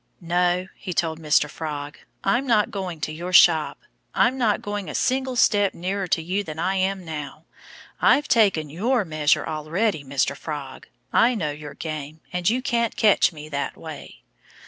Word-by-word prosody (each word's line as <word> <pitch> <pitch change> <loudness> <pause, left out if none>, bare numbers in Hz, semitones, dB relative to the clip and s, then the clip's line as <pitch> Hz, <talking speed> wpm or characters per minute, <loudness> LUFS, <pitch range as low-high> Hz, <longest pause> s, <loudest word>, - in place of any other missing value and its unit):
"No!" 180 +1 +1
he 185 - -6
told 160 -1 -1
Mr. 150 -1 +3
Frog. 145 -2 -6 0.2
"I'm 240 +7 +1
not 215 -4 +3
going 185 -5 -5
to 155 - -2
your 175 +4 -6
shop. 165 -3 +5 0.4
I'm 250 - +3
not 230 -6 +1
going 205 -4 -4
a - - -6
single 260 0 0
step 205 -4 +3
nearer 190 +2 -2
to 165 -1 0
you 190 +5 -1
than 155 -5 -7
I 185 +4 0
am 190 0 -1
now. 155 -1 -7 0.6
I've 295 +1 +4
taken 190 -10 +3
your 220 - 0
measure 155 -2 +1
already, 160 +3 -1
Mr. 140 0 0
Frog. 140 -3 -7 0.3
I 245 +1 +4
know 155 -9 -1
your 150 0 -9
game. 155 -1 -6
And 180 +1 +1
you 250 +3 0
can't 235 -4 0
catch 210 -3 +4
me 155 -2 -10
that 140 -1 -3
way." - - -10
175 Hz, 170 wpm, -23 LUFS, 155-205 Hz, 0.6 s, shop